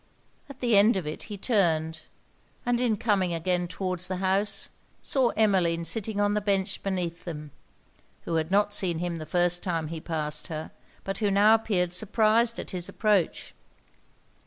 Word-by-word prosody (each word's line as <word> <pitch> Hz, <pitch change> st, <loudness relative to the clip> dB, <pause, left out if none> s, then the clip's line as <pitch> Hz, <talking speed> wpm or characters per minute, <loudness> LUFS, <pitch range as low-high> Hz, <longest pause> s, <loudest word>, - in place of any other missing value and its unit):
At 280 Hz, -, -12 dB
the 240 Hz, -3 st, +3 dB
end 205 Hz, +2 st, +5 dB
of 180 Hz, -, -3 dB
it 150 Hz, -, -5 dB
he 205 Hz, -, -5 dB
turned, 160 Hz, -7 st, +1 dB, 0.6 s
and, 245 Hz, 0 st, +1 dB
in 230 Hz, -4 st, +1 dB
coming 195 Hz, -5 st, +1 dB
again 180 Hz, +1 st, 0 dB
towards 180 Hz, 0 st, -3 dB
the 185 Hz, -, -2 dB
house, 195 Hz, +2 st, 0 dB, 0.3 s
saw 260 Hz, -3 st, +2 dB
Emmeline 180 Hz, -6 st, +2 dB
sitting 215 Hz, +1 st, -2 dB
on 205 Hz, 0 st, +2 dB
the 210 Hz, -, 0 dB
bench 195 Hz, -2 st, -1 dB
beneath 180 Hz, -3 st, -3 dB
them, 150 Hz, -4 st, -7 dB, 0.7 s
who 170 Hz, -, -4 dB
had 160 Hz, 0 st, -1 dB
not 205 Hz, +1 st, +2 dB
seen 180 Hz, -5 st, 0 dB
him 175 Hz, 0 st, -3 dB
the 155 Hz, -1 st, -7 dB
first 175 Hz, +2 st, +2 dB
time 165 Hz, -4 st, -2 dB
he 165 Hz, -1 st, -6 dB
passed 150 Hz, -2 st, -3 dB
her, 155 Hz, -2 st, -6 dB, 0.3 s
but 195 Hz, 0 st, -4 dB
who 210 Hz, -2 st, +1 dB
now 205 Hz, +2 st, +5 dB
appeared 190 Hz, -6 st, +1 dB
surprised 220 Hz, +4 st, +2 dB
at -, -, -6 dB
his 180 Hz, -2 st, -4 dB
approach. 210 Hz, -5 st, 0 dB
190 Hz, 170 wpm, -27 LUFS, 170-210 Hz, 0.7 s, end